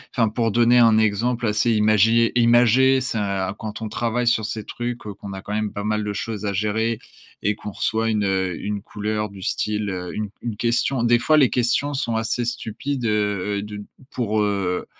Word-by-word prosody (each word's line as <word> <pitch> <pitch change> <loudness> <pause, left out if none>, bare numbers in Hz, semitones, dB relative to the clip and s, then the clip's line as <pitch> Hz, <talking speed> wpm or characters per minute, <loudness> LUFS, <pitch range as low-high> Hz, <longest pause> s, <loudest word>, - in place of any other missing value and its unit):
enfin, 115 -2 +3
pour 115 +1 0
donner 120 +2 +4
un 115 -2 +6
exemple 115 +3 +1
assez 105 +3 +2
imagié 110 +2 +3
imagé, 120 +3 +5
c'est, 125 -3 -2
heu, 100 -2 -1
quand 110 0 -6
on 110 - -3
travaille 120 +2 -1
sur 120 -2 +3
ces 110 0 -4
trucs, 120 0 -4
qu'on 100 -2 -8
a 95 - -7
quand 105 - -6
même 105 -1 -1
pas 100 - -4
mal 105 0 0
de 105 - -2
choses 105 +1 -4
à 100 - 0
gérer 110 +3 0 0.4
et 105 +1 +1
qu'on 105 - -7
reçoit 110 +3 -1
une, 105 -2 +1
heu, 95 -2 0
une 105 0 -3
couleur 105 +1 -3
du 100 -1 -12
style, 105 +1 -1
heu, 90 -2 -5
une 105 -1 -3
une 115 -4 -4
question 120 +2 +1
des 120 0 +4
fois, 155 +5 +3
les 135 -5 +5
questions 125 +4 +1
sont 120 -4 -1
assez 110 +2 -1
stupides, 120 +3 -4
heu 105 -2 0
heu, - - -3
de 105 0 -7 0.3
pour, 110 -3 0
heu, 100 -3 -1
110 Hz, 205 wpm, -22 LUFS, 105-120 Hz, 0.4 s, un